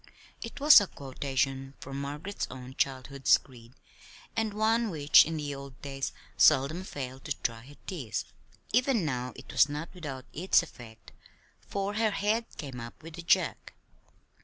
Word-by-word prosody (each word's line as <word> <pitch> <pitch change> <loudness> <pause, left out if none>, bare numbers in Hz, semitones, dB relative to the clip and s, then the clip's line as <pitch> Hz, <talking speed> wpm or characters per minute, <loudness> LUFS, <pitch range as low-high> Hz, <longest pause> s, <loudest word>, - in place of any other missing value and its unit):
it 230 +4 -7
was 290 -5 +9
a 200 - -1
quotation 135 -1 -3
from 135 +1 -6
Margaret's 150 +8 -4
own 130 0 -9
childhood's 135 0 +2
creed, 120 -2 -16 0.6
and 225 -1 0
one 220 +2 +2
which 150 -5 +6
in 165 0 -3
the 145 -1 -3
old 140 -1 -9
days 135 -1 -3 0.3
seldom 155 +5 +4
failed 130 -6 -7
to 145 - -1
dry 115 -1 -2
her 145 - -13
tears. 135 - -4 0.5
Even 250 -5 +3
now 125 -3 -2
it - - -11
was 145 - +5
not 150 +3 -4
without 140 -8 -7
its 180 +2 +3
effect, 115 -8 -13 0.6
for 200 0 -2
her 220 +1 +2
head 210 +3 0
came 135 -4 -6
up 115 +6 -9
with 165 0 -9
a - - -3
jerk. 170 0 +1
145 Hz, 160 wpm, -29 LUFS, 130-190 Hz, 0.6 s, was